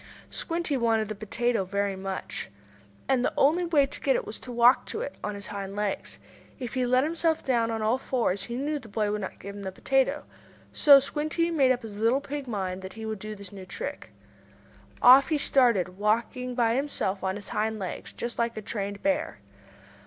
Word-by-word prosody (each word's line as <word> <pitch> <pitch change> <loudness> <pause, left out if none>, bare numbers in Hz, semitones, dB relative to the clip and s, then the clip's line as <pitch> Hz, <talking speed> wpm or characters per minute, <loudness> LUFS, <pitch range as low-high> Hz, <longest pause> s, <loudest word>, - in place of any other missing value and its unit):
Squinty 335 -3 -2
wanted 225 -3 +1
that 215 -1 -6
potato 230 +1 0
very 200 +1 -1
much. 190 0 -5 0.6
And 255 -2 +2
the - - +1
only 325 +6 +4
way 305 -5 +4
to 275 - -10
get - - +3
it - - -1
was - - -6
to 250 - -9
walk 245 +1 +5
to - - -4
it 280 - -4
on 210 0 -3
his 200 0 -6
hind 200 -1 -5
legs. 205 -1 -3 0.4
If 245 -3 -5
he 255 -2 0
let 255 +1 +4
himself 325 +1 0
down 235 -3 +2
on 225 -1 -2
all 225 +4 +2
four 255 -3 0
legs 195 +2 -1
he 235 - -5
knew 290 +3 -1
the 245 - -13
boy 210 0 -1
would 210 0 -2
not 190 - -6
give 200 +1 -8
him 205 - -8
the 190 -1 -4
potato. 270 +7 +1 0.5
So 285 -2 +8
Squinty 310 +4 -1
made 275 -6 +4
up 250 -1 0
his 210 -2 -8
little 230 +5 +3
pig 285 -1 -6
mind 190 -4 -3
that 190 0 -8
he 220 0 -7
would 220 -2 -4
do 215 +2 -6
this 200 -2 -9
new 190 -2 -10
trick. 180 - -6 0.9
Off 260 +2 +8
he 310 - +2
started, 220 -10 +2
walking 235 +4 0
by 230 -2 +2
himself 245 -8 -1
on 190 0 0
his 205 -1 -9
hind 220 +1 -1
legs, 190 -3 -5
just 235 0 -5
like 235 -1 0
a - - -3
trained 200 -1 -4
bear. 295 +1 0
235 Hz, 210 wpm, -27 LUFS, 205-270 Hz, 0.9 s, So